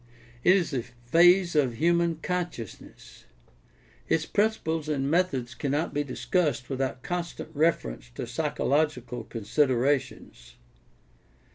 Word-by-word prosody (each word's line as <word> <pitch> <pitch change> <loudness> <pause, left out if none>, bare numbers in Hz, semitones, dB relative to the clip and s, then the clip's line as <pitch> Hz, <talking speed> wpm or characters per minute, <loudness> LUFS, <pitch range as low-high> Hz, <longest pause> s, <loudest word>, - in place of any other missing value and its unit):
It 180 - +6
is 175 -6 0
a 130 - 0
phase 165 +10 +3
of 135 -6 +2
human 170 +3 +2
consciousness. 175 - -6 0.8
Its 160 0 +2
principles 165 -8 0
and 140 -1 0
methods 140 -9 0
cannot 145 +5 -2
be 145 - 0
discussed 145 0 -1
without 130 -1 -2
con 175 -1 -1
stant 170 - -9
reference 140 - 0
to - - -4
psychological 125 -5 -1
considerations. 120 - -1
145 Hz, 110 wpm, -27 LUFS, 125-170 Hz, 0.8 s, It